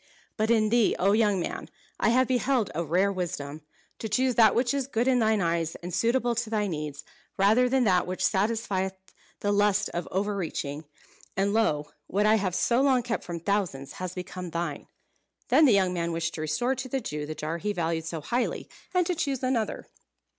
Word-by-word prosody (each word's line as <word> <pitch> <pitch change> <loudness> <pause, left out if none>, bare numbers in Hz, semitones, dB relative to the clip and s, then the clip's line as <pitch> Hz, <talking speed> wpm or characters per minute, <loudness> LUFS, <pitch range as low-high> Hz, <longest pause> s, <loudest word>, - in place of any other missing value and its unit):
"But 220 0 0
in 220 -2 +3
thee, 235 -1 +3
O 195 +2 +3
young 210 -2 +3
man! 170 - -4 0.3
I - - +3
have 255 +2 +3
beheld 255 -3 +1
a 170 - -1
rare 180 +5 +2
wisdom. 155 -5 -4 0.4
To 220 - -4
choose 255 +4 +2
that 225 -3 +5
which 240 +1 +2
is 275 -2 -1
good 240 -2 0
in 255 -1 +4
thine 220 -2 +2
eyes, 165 -2 0
and 175 +1 -7
suitable 240 +3 +1
to 230 -1 -2
thy 215 -2 0
needs, 150 -5 -4 0.3
rather 220 +6 +4
than 260 0 +3
that 185 -5 +3
which 185 0 -1
satisfieth 195 -2 0 0.5
the 205 - +1
lust 205 0 +2
of 175 - -4
over 205 +2 -1
reaching; 155 -5 -4 0.5
and 200 +1 +1
lo! 150 -10 +1 0.2
what 205 +3 +1
I 215 +1 +5
have 190 -4 -1
so 240 +5 +2
long 265 -3 +3
kept 230 -1 -2
from 170 -2 -6
thousands, 175 -9 -1
has 185 -1 -4
become 180 0 -6
thine!" 165 -3 -4 0.6
Then 310 - +6
the 265 - +6
young 190 -2 +3
man 170 -1 -1
wished 165 0 -2
to 155 - -5
restore 155 - 0
to 260 0 -5
the 270 - -1
Jew 150 - -5
the 155 - -5
jar 160 +3 -4
he 210 +4 -1
valued 165 -3 -2
so 165 -1 -4
highly, 240 - -2 0.3
and 360 -1 +4
to 360 - 0
choose 280 -6 -2
another. 250 -4 -1
200 Hz, 205 wpm, -27 LUFS, 170-235 Hz, 0.6 s, Then